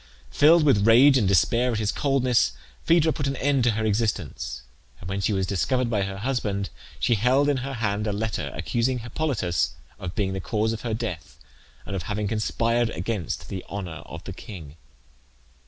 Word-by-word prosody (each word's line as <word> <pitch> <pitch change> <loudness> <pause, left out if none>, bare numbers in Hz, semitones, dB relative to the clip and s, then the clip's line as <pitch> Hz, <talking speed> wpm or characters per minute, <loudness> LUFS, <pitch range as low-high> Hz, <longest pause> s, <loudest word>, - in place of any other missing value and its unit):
Filled 160 +3 +6
with 110 -8 +4
rage 130 +5 +7
and 115 -7 +3
despair 115 +7 +3
at - - -1
his 105 -1 0
coldness 130 - +2 0.3
Phaedra 165 -2 +4
put 145 -3 -2
an 135 - -1
end 140 -1 +1
to 120 - +4
her 110 - 0
existence; 105 - -2 0.4
and 90 - -9
when 95 +1 -2
she 100 - +1
was 95 -2 0
discovered 120 +6 0
by 105 -3 +1
her 95 0 -3
husband 105 -4 -2 0.3
she 120 - +2
held 125 +6 +3
in 145 -2 +2
her 135 +2 -4
hand 105 -2 -1
a - - 0
letter, 105 +1 -2
accusing 120 +2 0
Hippolytus 120 - -1 0.2
of 90 -1 -6
being 95 -3 0
the 95 - -3
cause 110 +4 0
of 110 - -6
her 115 -3 -2
death, 105 -7 -5 0.5
and 100 - -5
of 95 - -2
having 105 0 -1
conspired 115 +2 0
against 90 -1 -3
the 95 -2 -5
honour 90 -6 -5
of - - -9
the - - -7
king. 80 -8 -10
110 Hz, 190 wpm, -25 LUFS, 100-125 Hz, 0.5 s, rage